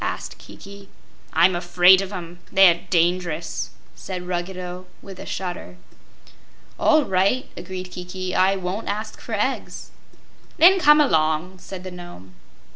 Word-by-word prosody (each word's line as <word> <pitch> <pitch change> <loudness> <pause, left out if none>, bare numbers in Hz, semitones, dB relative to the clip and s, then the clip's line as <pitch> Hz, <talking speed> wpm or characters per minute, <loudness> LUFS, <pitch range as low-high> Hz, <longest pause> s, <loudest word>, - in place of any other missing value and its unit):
asked - - -5
Kiki. 200 0 -13 0.4
"I'm 180 +1 +4
afraid 180 +2 +5
of 195 0 -6
'em; 175 -2 -8
they're 180 -3 +5
dangerous!" 175 -2 0 0.2
said 180 -2 -7
Ruggedo, 180 0 -5 0.2
with 195 -2 -11
a - - -9
shudder. 180 -1 -6 1.0
"All 310 -2 +4
right," 195 +8 +1
agreed 185 0 -7
Kiki; 180 +1 -6
"I 190 +1 +3
won't 190 +3 -4
ask 215 +1 -5
for 225 - -4
eggs." 215 +6 -3 0.7
"Then 375 +4 +7
come 300 -3 +6
along," 160 - +1
said 185 0 -9
the 185 - -7
Nome. 175 - -12
185 Hz, 130 wpm, -22 LUFS, 175-195 Hz, 1.0 s, Then